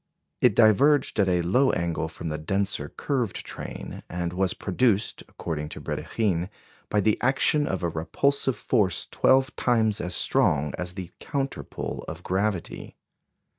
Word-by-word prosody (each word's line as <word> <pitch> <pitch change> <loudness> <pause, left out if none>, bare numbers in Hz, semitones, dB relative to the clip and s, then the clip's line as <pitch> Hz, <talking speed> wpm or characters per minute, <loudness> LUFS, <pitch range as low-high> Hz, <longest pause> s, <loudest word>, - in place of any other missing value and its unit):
It 120 -5 +4
diverged 130 +5 +4
at 100 -2 +4
a 90 -1 +2
low 125 +10 +3
angle 85 -2 -1
from 80 +1 -6
the 75 0 -3
denser 95 +5 -1
curved 125 -8 -2
train, - - -7
and 85 0 -3
was 95 0 0
produced, 105 +1 +1
according 75 -2 -4
to - - -8
Brédikhine, 95 -5 -1 0.4
by 105 - +2
the 105 +1 +2
action 135 +3 +2
of 95 -1 -2
a 85 - +1
repulsive 125 - 0
force 105 -6 +1
twelve 135 +2 +2
times 110 -4 +2
as 90 0 -1
strong 75 0 +2
as 90 0 -5
the 90 -3 -6
counter 140 -2 -3
pull - - -6
of 80 +2 -7
gravity. 95 -1 -2
95 Hz, 150 wpm, -26 LUFS, 85-125 Hz, 0.4 s, It